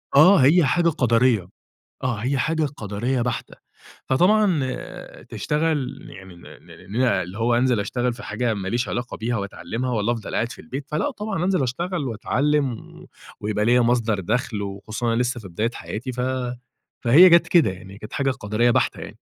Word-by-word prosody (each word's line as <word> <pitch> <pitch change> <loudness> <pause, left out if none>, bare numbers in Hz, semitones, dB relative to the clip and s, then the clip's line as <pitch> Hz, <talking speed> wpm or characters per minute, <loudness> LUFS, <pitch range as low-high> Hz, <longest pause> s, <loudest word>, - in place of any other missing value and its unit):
آه، 180 +8 +8
هي 160 +3 +5
حاجة 170 +6 +2
قَدَريّة 120 - +2 0.6
آه 125 -2 0
هي 130 +6 -1
حاجة 160 +4 0
قَدَريّة 110 +5 -2
بحتة. 120 -2 -3 0.5
فطبعًا 180 +1 +3 0.6
تشتغل 150 -4 -2
يعني 95 -2 -12
نع 85 - -13
ن - - -23
ن 95 +5 -8
ن 130 - +3
اللي 95 -5 0
هو 120 +1 +2
أنزَل 120 -2 +2
أشتغل 120 +4 -1
في 120 - -10
حاجة 115 +1 -1
ما 95 -2 -4
ليش 120 +2 -1
علاقة 120 +1 -4
بيها 120 +2 -2
وأتعلمها 115 +5 -4
والّا 115 0 0
أفضل 115 -3 -6
قاعد 115 +1 -1
في - - -12
البيت، 135 +2 -6
فلأ 155 - -1
طبعًا 210 - -3
أنزَل 185 -5 +1
أشتغل 170 +6 -2
وأتعلم 140 +4 0
و 110 - -12 0.3
ويبقى 105 0 -1
ليّا 125 +2 +4
مَصدَر 115 -3 +1
دخل، 105 +1 -2
وخُصوصًا 100 +4 -5
أنا 120 - +2
لسة 125 -1 -2
في 95 - -10
بداية 105 +7 -1
حياتي 125 +4 -6
ف 125 - -5 0.8
فهي 150 +10 +8
جات 170 -1 +5
كده 170 - +4
يعني، 95 +1 -10
كانت 105 0 -10
حاجة 135 -1 0
قَدَريّة 110 0 0
بحتة - - +1
يعني. - - -8
120 Hz, 180 wpm, -23 LUFS, 110-140 Hz, 0.8 s, آه